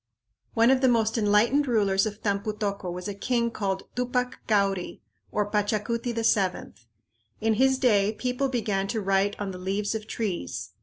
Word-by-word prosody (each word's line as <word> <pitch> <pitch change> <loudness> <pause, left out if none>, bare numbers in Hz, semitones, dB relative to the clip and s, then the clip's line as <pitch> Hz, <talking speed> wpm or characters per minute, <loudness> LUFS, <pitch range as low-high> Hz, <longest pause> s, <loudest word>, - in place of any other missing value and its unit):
One 230 +2 +5
of 265 -1 +3
the 260 - +4
most 225 -2 +2
enlightened 230 +6 +3
rulers 200 -4 +2
of 210 0 -8
Tampu 200 +1 -1
tocco 200 -4 -3
was 180 +2 -6
a 205 - -3
king 235 +3 0
called 195 -3 -2
Tupac 250 0 -1
Cauri, 195 -4 0 0.3
or 210 - 0
Pachacuti 215 +3 0
VII. 215 -5 0 0.7
In 220 0 +2
his 265 +4 +3
day 210 -6 +3
people 250 +4 -2
began 210 -6 -1
to 225 +2 -2
write 195 0 +1
on 200 -2 -3
the 180 - -8
leaves 195 +3 -1
of 215 -1 -5
trees. 190 - -4
210 Hz, 165 wpm, -26 LUFS, 200-235 Hz, 0.7 s, One